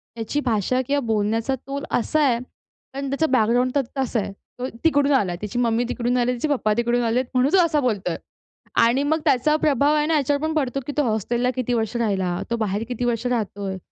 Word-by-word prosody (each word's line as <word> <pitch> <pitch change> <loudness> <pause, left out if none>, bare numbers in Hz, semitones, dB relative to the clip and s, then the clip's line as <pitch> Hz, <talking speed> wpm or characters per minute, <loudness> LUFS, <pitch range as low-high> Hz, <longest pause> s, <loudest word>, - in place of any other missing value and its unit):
त्याची 230 +6 -2
भाषा 235 +3 +1
किंवा 285 0 +1
बोलण्याचा 225 +4 0
तोल 275 +2 -6
असा 310 +6 +1
आहे, 245 -4 +3 0.6
पण 275 0 -4
त्याचा 280 +4 +1
बॅकग्राऊंड 245 +1 +3
तर 280 - +4 0.2
तसा 255 -3 0
आहे. 200 - -3 0.3
तो 255 - -2 0.2
तिकडून 285 -3 +3
आला, 190 -9 +1
त्याची 210 +4 -3
मम्मी 235 0 +2
तिकडून 245 0 0
आली, 245 +1 +1
तिचे 250 +6 -2
पप्पा 240 -7 +1
तिकडून 240 +1 +1
आलेत 240 +3 +1
म्हणून 255 +3 +2
तो - - +6
असा 305 -2 +1
बोलतोय. 205 -9 -1 0.7
आणि 250 +5 +3
मग 315 +2 +1
त्याचा 285 +2 +3
प्रभाव 290 -1 +2
आहे 300 0 +2
ना 325 - +2
याच्यावर 285 +1 0
पण 315 0 -1
पडतो, 275 -2 0
की - - -2
तो 295 - +3
हॉस्टेलला 240 +2 0
किती 250 -1 -1
वर्ष 225 0 -1
राहिला? 190 -6 0
तो 235 - 0
बाहेर 210 0 -1
किती 245 0 -2
वर्ष 235 0 -1
राहतोय? 200 -5 -2
245 Hz, 205 wpm, -23 LUFS, 225-275 Hz, 0.7 s, तो